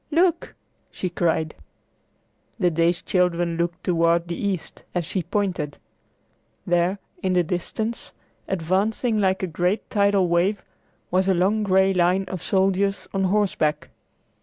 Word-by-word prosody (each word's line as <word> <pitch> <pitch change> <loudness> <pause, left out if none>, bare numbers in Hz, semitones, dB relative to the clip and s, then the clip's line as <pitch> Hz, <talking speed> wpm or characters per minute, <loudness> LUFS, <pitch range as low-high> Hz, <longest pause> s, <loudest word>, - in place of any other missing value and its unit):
Look!" 340 +2 +1 0.3
she 185 - -4
cried. 160 -3 0 1.0
The 180 -5 +2
dazed 170 +2 +1
children 175 -2 +1
looked 170 +1 -2
toward 170 -1 +2
the 170 - -2
east 195 -3 -3
as 175 -2 0
she 185 +3 -2
pointed. 180 -4 -2 0.9
There 175 +2 +1 0.2
in 185 -1 0
the 180 -1 +3
distance, 215 +7 -4 0.4
advancing 200 +6 0
like 190 -1 +1
a - - +3
great 180 +4 -1
tidal 200 -2 +3
wave, 175 +4 +1 0.5
was 185 +1 +2
a 190 - +4
long 195 +5 +2
gray 190 -1 +3
line 180 +1 +2
of 185 -3 -5
soldiers 195 +1 +1
on 195 -1 +1
horseback. 185 -6 0
185 Hz, 135 wpm, -23 LUFS, 170-200 Hz, 1.0 s, a